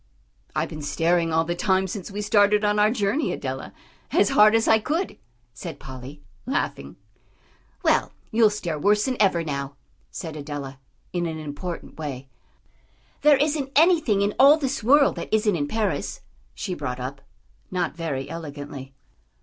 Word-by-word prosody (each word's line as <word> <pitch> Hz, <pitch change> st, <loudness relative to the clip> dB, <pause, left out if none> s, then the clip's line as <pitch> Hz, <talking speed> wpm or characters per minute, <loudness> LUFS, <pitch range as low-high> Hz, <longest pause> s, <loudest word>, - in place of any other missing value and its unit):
"I've -, -, 0 dB
been 155 Hz, -, -7 dB
staring 165 Hz, +3 st, +1 dB
all 160 Hz, +1 st, +3 dB
the 175 Hz, +1 st, -2 dB
time 190 Hz, +1 st, +1 dB
since 190 Hz, 0 st, -6 dB
we 205 Hz, +1 st, -4 dB
started 205 Hz, 0 st, +4 dB
on 210 Hz, 0 st, +2 dB
our 210 Hz, +1 st, +5 dB
journey, 225 Hz, +5 st, 0 dB
Adela, -, -, -5 dB, 0.4 s
as -, -, +3 dB
hard 215 Hz, -5 st, +6 dB
as 225 Hz, -, +2 dB
I 220 Hz, -, +5 dB
could," 320 Hz, -, -2 dB, 0.4 s
said -, -, -8 dB
Polly, 130 Hz, +3 st, -10 dB, 0.2 s
laughing. 265 Hz, -, -2 dB, 0.9 s
"Well, -, -, +2 dB, 0.2 s
you'll 220 Hz, -1 st, +5 dB
stare 175 Hz, -7 st, -4 dB
worse 210 Hz, +5 st, +3 dB
than 260 Hz, -, -1 dB
ever 180 Hz, -5 st, +3 dB
now," 140 Hz, -2 st, -4 dB, 0.3 s
said 160 Hz, -2 st, -7 dB
Adela, 140 Hz, -2 st, -6 dB, 0.3 s
in 175 Hz, -1 st, 0 dB
an 160 Hz, -1 st, -4 dB
important 155 Hz, +3 st, -7 dB
way. 135 Hz, -4 st, -5 dB, 0.9 s
"There 295 Hz, -2 st, +6 dB
isn't 290 Hz, -1 st, 0 dB
anything 310 Hz, -, +4 dB
in 205 Hz, +1 st, 0 dB
all 280 Hz, +3 st, +8 dB
this 275 Hz, -5 st, -2 dB
world 280 Hz, +4 st, +5 dB
that -, -, -6 dB
isn't 215 Hz, -2 st, +2 dB
in 145 Hz, -3 st, -1 dB
Paris," 220 Hz, +4 st, -2 dB, 0.3 s
she 190 Hz, -, -4 dB
brought 125 Hz, -7 st, -4 dB
up, 135 Hz, +2 st, -6 dB, 0.5 s
not 180 Hz, -4 st, -2 dB
very 150 Hz, -6 st, -3 dB
elegantly. 145 Hz, -4 st, -8 dB
185 Hz, 160 wpm, -24 LUFS, 150-220 Hz, 0.9 s, all